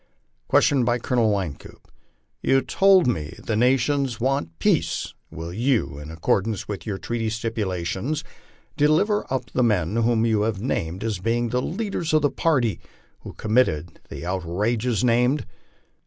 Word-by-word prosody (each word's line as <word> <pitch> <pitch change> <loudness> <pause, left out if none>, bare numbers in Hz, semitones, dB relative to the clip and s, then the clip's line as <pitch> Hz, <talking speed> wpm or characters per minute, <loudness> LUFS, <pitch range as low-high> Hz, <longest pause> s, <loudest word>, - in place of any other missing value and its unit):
Question 140 -3 +4
by 120 +1 +2
Colonel 120 -2 +1
Wynkoop: 95 -8 -5 0.5
You 135 0 +3
told 190 +3 +4
me 80 -11 -2
your 110 - +1
nation 135 +4 +2
wants 135 -3 0
peace; - - 0 0.2
will 80 +1 -7
you, 115 - 0
in 75 +1 -9
accordance 95 +5 -1
with 105 +1 -6
your 100 -2 -2
treaty 115 +1 -2
stipulations, 110 - -2 0.5
deliver 165 +8 +2
up 130 -4 -2
the 125 - 0
men 105 -5 +1
whom 115 -1 +2
you 110 -2 +2
have 105 -2 -1
named 95 -6 -2
as 110 -4 -2
being 115 +4 0
the 125 +2 0
leaders 180 - -3
of 155 - +3
the 145 - +3
party 125 - +1 0.4
who - - -10
committed 95 -8 0
the - - -7
outrages 105 +7 -1
named?" 125 +4 +2
115 Hz, 145 wpm, -24 LUFS, 95-130 Hz, 0.5 s, Question